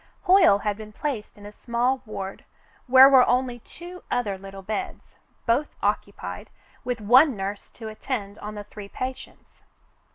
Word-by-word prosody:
Hoyle 375 Hz, -, +6 dB
had 205 Hz, 0 st, -2 dB
been 215 Hz, -1 st, -10 dB
placed 235 Hz, -5 st, -4 dB
in 205 Hz, -, -13 dB
a 205 Hz, -, -8 dB
small 245 Hz, +4 st, -1 dB
ward 195 Hz, -2 st, -6 dB, 0.4 s
where 260 Hz, +1 st, +9 dB
were 265 Hz, -2 st, +7 dB
only 245 Hz, -1 st, +1 dB
two 350 Hz, +8 st, -11 dB
other 220 Hz, -5 st, -1 dB
little 195 Hz, 0 st, -10 dB
beds, 220 Hz, -, -5 dB, 0.3 s
both 250 Hz, +6 st, +1 dB
occupied, -, -, -3 dB, 0.3 s
with 245 Hz, -1 st, -3 dB
one 255 Hz, +6 st, +5 dB
nurse 200 Hz, +1 st, -5 dB
to 225 Hz, -, -9 dB
attend 215 Hz, -2 st, -5 dB
on 210 Hz, +1 st, -7 dB
the 205 Hz, -, -6 dB
three 205 Hz, 0 st, -11 dB
patients. 255 Hz, +4 st, -8 dB
230 Hz, 155 wpm, -25 LUFS, 205-260 Hz, 0.4 s, where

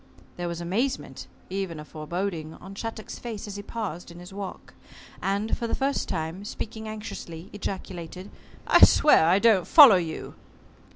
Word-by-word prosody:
There 175 Hz, 0 st, -4 dB
was 170 Hz, -1 st, -4 dB
amazement 220 Hz, +11 st, -2 dB, 0.2 s
even 190 Hz, -4 st, -3 dB
a 150 Hz, -, -8 dB
foreboding 160 Hz, +1 st, -4 dB
on 190 Hz, +2 st, -11 dB
Shattuck's 220 Hz, +1 st, -6 dB
face 225 Hz, -4 st, -6 dB
as 205 Hz, -2 st, -7 dB
he 205 Hz, -, -5 dB
paused 205 Hz, -6 st, -5 dB
in 170 Hz, -, -12 dB
his 180 Hz, +2 st, -11 dB
walk, 200 Hz, -1 st, -7 dB, 0.5 s
and, 200 Hz, +3 st, 0 dB
for 235 Hz, -, -3 dB
the -, -, -1 dB
first 275 Hz, +1 st, -1 dB
time 165 Hz, +2 st, -3 dB
speaking 220 Hz, +1 st, -6 dB
anxiously 200 Hz, -5 st, -8 dB
ejaculated, 185 Hz, -2 st, -6 dB, 0.3 s
"I -, -, +6 dB
swear 300 Hz, -, +7 dB
I 180 Hz, +3 st, +5 dB
don't 200 Hz, -5 st, +4 dB
follow 275 Hz, -, +9 dB
you!" 165 Hz, -3 st, -4 dB
195 Hz, 160 wpm, -26 LUFS, 170-215 Hz, 0.5 s, follow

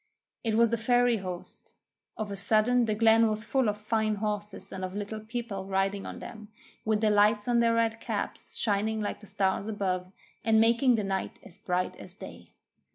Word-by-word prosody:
It 225 Hz, -2 st, 0 dB
was 230 Hz, 0 st, +4 dB
the 235 Hz, -, +1 dB
fairy 245 Hz, 0 st, +3 dB
host. 185 Hz, -3 st, -8 dB, 0.4 s
Of 215 Hz, -2 st, -4 dB
a -, -, -3 dB
sudden 225 Hz, +4 st, +3 dB
the 215 Hz, -1 st, 0 dB
glen 225 Hz, +1 st, +5 dB
was 215 Hz, 0 st, -2 dB
full 255 Hz, 0 st, +1 dB
of 205 Hz, -, -2 dB
fine 215 Hz, 0 st, 0 dB
horses 205 Hz, -2 st, -4 dB
and 190 Hz, -1 st, -6 dB
of 185 Hz, +1 st, -4 dB
Little 210 Hz, +1 st, -4 dB
People 220 Hz, -3 st, -5 dB
riding 195 Hz, +1 st, 0 dB
on -, -, -7 dB
them, 215 Hz, -2 st, -9 dB, 0.4 s
with 215 Hz, -1 st, +1 dB
the 215 Hz, -1 st, +3 dB
lights 210 Hz, +1 st, +3 dB
on 240 Hz, -1 st, +3 dB
their 230 Hz, -1 st, +3 dB
red 225 Hz, 0 st, +1 dB
caps, -, -, -4 dB
shining 220 Hz, 0 st, 0 dB
like 210 Hz, -, -3 dB
the 210 Hz, -, -14 dB
stars 195 Hz, +1 st, 0 dB
above, 185 Hz, -4 st, -2 dB, 0.3 s
and 220 Hz, 0 st, +4 dB
making 235 Hz, +3 st, +4 dB
the 215 Hz, -, -1 dB
night 195 Hz, -1 st, -3 dB
as 175 Hz, -, -12 dB
bright 180 Hz, 0 st, -1 dB
as -, -, -10 dB
day. -, -, -11 dB
215 Hz, 195 wpm, -29 LUFS, 200-225 Hz, 0.4 s, glen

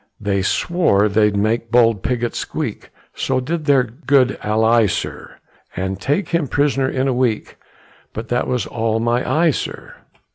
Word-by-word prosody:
They 100 Hz, -2 st, 0 dB
swore 105 Hz, -, +2 dB
they'd 105 Hz, 0 st, +2 dB
make 115 Hz, +3 st, 0 dB
bold 115 Hz, -3 st, +3 dB
Pigot 120 Hz, +1 st, -1 dB
squeak, -, -, -4 dB, 0.2 s
So 130 Hz, -1 st, -1 dB
did 155 Hz, +4 st, -3 dB
their 140 Hz, -3 st, +4 dB
good 130 Hz, +1 st, +1 dB
ally, 110 Hz, +1 st, +3 dB
sir, -, -, -5 dB, 0.4 s
And 95 Hz, +1 st, -3 dB
take 145 Hz, +8 st, -1 dB
him 170 Hz, -4 st, 0 dB
pris'ner 135 Hz, -1 st, +1 dB
in 135 Hz, 0 st, -1 dB
a 130 Hz, -, +1 dB
week, 120 Hz, -3 st, -1 dB, 0.5 s
But 115 Hz, +1 st, -6 dB
that 120 Hz, 0 st, 0 dB
was 125 Hz, -2 st, -1 dB
all 115 Hz, -1 st, -1 dB
my 120 Hz, +2 st, +1 dB
eye, 165 Hz, +1 st, +3 dB
sir. -, -, -6 dB
120 Hz, 155 wpm, -19 LUFS, 110-135 Hz, 0.5 s, their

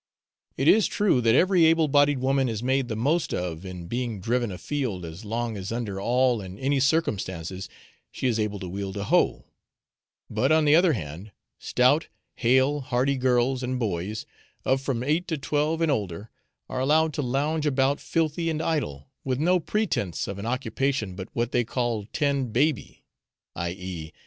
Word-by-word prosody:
It -, -, 0 dB
is 215 Hz, -1 st, +6 dB
true 200 Hz, -12 st, +2 dB
that 115 Hz, 0 st, +4 dB
every 180 Hz, +2 st, +4 dB
able 160 Hz, -1 st, +4 dB
bodied 145 Hz, 0 st, +4 dB
woman 135 Hz, 0 st, +1 dB
is 110 Hz, 0 st, -3 dB
made 130 Hz, 0 st, +1 dB
the 110 Hz, -, -3 dB
most 145 Hz, +9 st, 0 dB
of 90 Hz, -1 st, -4 dB
in 90 Hz, -2 st, -7 dB
being 120 Hz, +1 st, -3 dB
driven 120 Hz, +2 st, 0 dB
a 90 Hz, -, -6 dB
field 120 Hz, -12 st, -3 dB
as 80 Hz, +6 st, -9 dB
long 115 Hz, +1 st, -2 dB
as 95 Hz, +1 st, -5 dB
under 110 Hz, -5 st, -3 dB
all 125 Hz, +1 st, +2 dB
and 95 Hz, 0 st, -9 dB
any 135 Hz, +1 st, +1 dB
circumstances 95 Hz, -, -1 dB, 0.4 s
she -, -, -5 dB
is 115 Hz, -3 st, +2 dB
able 105 Hz, -1 st, -1 dB
to 95 Hz, -, -5 dB
wield 95 Hz, +2 st, -5 dB
a 100 Hz, -, -2 dB
hoe; -, -, +2 dB, 0.8 s
but 120 Hz, +7 st, 0 dB
on 155 Hz, -1 st, +4 dB
the 145 Hz, +1 st, +6 dB
other 170 Hz, -1 st, +5 dB
hand, 90 Hz, -, -6 dB, 0.3 s
stout, 130 Hz, +6 st, +2 dB, 0.3 s
hale, 130 Hz, +4 st, +3 dB
hearty 130 Hz, +2 st, 0 dB
girls 125 Hz, 0 st, +1 dB
and 130 Hz, 0 st, -2 dB
boys, 105 Hz, -1 st, -3 dB, 0.4 s
of 135 Hz, +1 st, +2 dB
from 130 Hz, -3 st, -2 dB
eight 155 Hz, +6 st, 0 dB
to 160 Hz, -, -1 dB
twelve 150 Hz, +3 st, 0 dB
and 165 Hz, -2 st, +3 dB
older, 100 Hz, -3 st, -3 dB, 0.4 s
are -, -, -4 dB
allowed 155 Hz, +4 st, +3 dB
to 145 Hz, -, -2 dB
lounge 145 Hz, +4 st, 0 dB
about 135 Hz, 0 st, +2 dB
filthy 165 Hz, +1 st, 0 dB
and 155 Hz, -1 st, -1 dB
idle, 140 Hz, -, -2 dB, 0.2 s
with 130 Hz, -2 st, -1 dB
no 180 Hz, +5 st, +3 dB
pretence 170 Hz, -, -1 dB
of 100 Hz, 0 st, -5 dB
an 105 Hz, -, -4 dB
occupation 125 Hz, -3 st, -1 dB
but 95 Hz, +2 st, -7 dB
what 120 Hz, 0 st, -1 dB
they 120 Hz, -, +2 dB
call 115 Hz, -3 st, -2 dB
'tend 140 Hz, -5 st, 0 dB
baby,' 140 Hz, +3 st, 0 dB, 0.5 s
i.e. 85 Hz, -2 st, -5 dB
125 Hz, 180 wpm, -26 LUFS, 105-145 Hz, 0.8 s, is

